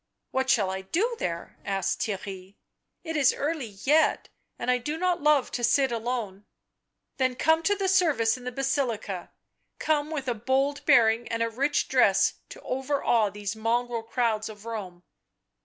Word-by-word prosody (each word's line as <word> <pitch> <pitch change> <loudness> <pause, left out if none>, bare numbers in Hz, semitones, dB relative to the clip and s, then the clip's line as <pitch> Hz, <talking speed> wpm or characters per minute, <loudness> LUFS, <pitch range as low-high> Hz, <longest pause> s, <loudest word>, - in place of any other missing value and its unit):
"What 265 0 -1
shall 205 -7 +3
I 190 0 -4
do 400 - -1
there?" 170 -1 -4
asked 195 -2 -1
Theirry. 195 -2 -5 0.5
"It 325 -1 -4
is 280 -2 +4
early 280 -9 -3
yet, 305 +3 +3 0.3
and 250 - 0
I 250 - +2
do 295 +6 -4
not 360 0 0
love 300 -3 +3
to 240 - -4
sit 260 +2 +3
alone." 225 -4 -3 0.3
" - - -54
Then 255 -1 +1
come 320 +5 +3
to 410 +5 +2
the 390 -1 -1
service 315 -12 +3
in 250 - -11
the 250 - -4
Basilica 245 -8 -2 0.3
— - - -48
come 300 -1 0
with 290 -4 -4
a 245 - +1
bold 265 +5 0
bearing 230 0 +4
and 230 0 -1
a 230 - -1
rich 280 +5 0
dress - - +4 0.2
to - - -10
overawe 255 -5 +1
these 205 +1 -5
mongrel 235 +1 -1
crowds 225 -2 -1
of 210 0 -12
Rome." 190 -6 -6
245 Hz, 175 wpm, -27 LUFS, 215-285 Hz, 0.5 s, is